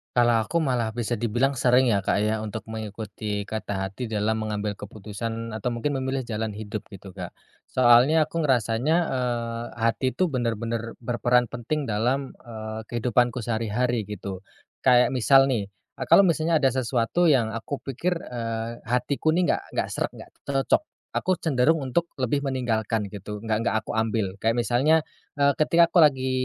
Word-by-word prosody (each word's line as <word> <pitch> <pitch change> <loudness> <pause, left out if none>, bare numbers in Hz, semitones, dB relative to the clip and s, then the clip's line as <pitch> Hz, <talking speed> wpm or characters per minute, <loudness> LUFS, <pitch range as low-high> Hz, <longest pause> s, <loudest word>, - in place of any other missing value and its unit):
Kalau 120 -2 +4
aku 170 -1 +1
malah 120 -5 -1
bisa 120 -1 -2
dibilang 120 +4 0
sering 125 0 +4
ya, 100 - +3
Kak, 100 +1 0
ya, 110 0 0
untuk 110 -1 -5
mengikuti 105 -1 -5
kata 100 -2 -4
hati 100 +6 -5
dalam 110 0 0
mengambil 105 -1 -2
keputusan 110 +3 -6
atau 110 +1 -4
mungkin 130 +5 -1
memilih 130 -1 -2
jalan 110 -2 -3
hidup 105 0 -6
gitu, 100 -1 -11
Kak. 90 -2 -8 0.3
Soalnya 130 +6 +5
aku 160 +2 -4
ngerasanya, 130 0 +2 0.2
eee, 120 -2 -2
hati 115 +3 0
tuh 185 -3 +1
bener-bener 115 -2 -2
berperan 120 0 +1
penting 125 +6 -2
dalam, 125 +4 -1
eee, 110 -2 -8
kehidupanku 120 0 +1
sehari-hari 115 0 -1
gitu. 100 -2 -6 0.4
Kayak 125 -1 +4
misal 135 +2 +5
nih, 105 -5 -1
eee, 100 +6 -10
kalau 195 - +7
misalnya 160 -3 +2
ada 135 - +5
sesuatu 130 +6 +1
yang 125 -8 +3
aku 115 +5 -5
pikir, 165 +7 -1
eee, 115 -5 -4
hatiku 135 +6 +1
nih 180 0 +3
nggak - - -1
nggak - - 0
sreg, - - -2
nggak - - -12 0.2
cocok 135 - +2 0.3
aku 185 - 0
cenderung 155 +1 +2
untuk 165 +7 0
lebih 130 +2 0
meninggalkan 115 -6 -1
gitu 105 +1 -7
nggak 110 +1 0
nggak - - +1
aku - - -6
ambil 110 -3 0
kayak 115 +2 +1
misalnya, 150 +7 +3 0.3
eee, 140 -1 +4
ketika 170 +2 +4
aku 180 - +4
lagi 135 -4 +4
120 Hz, 165 wpm, -25 LUFS, 110-135 Hz, 0.4 s, kalau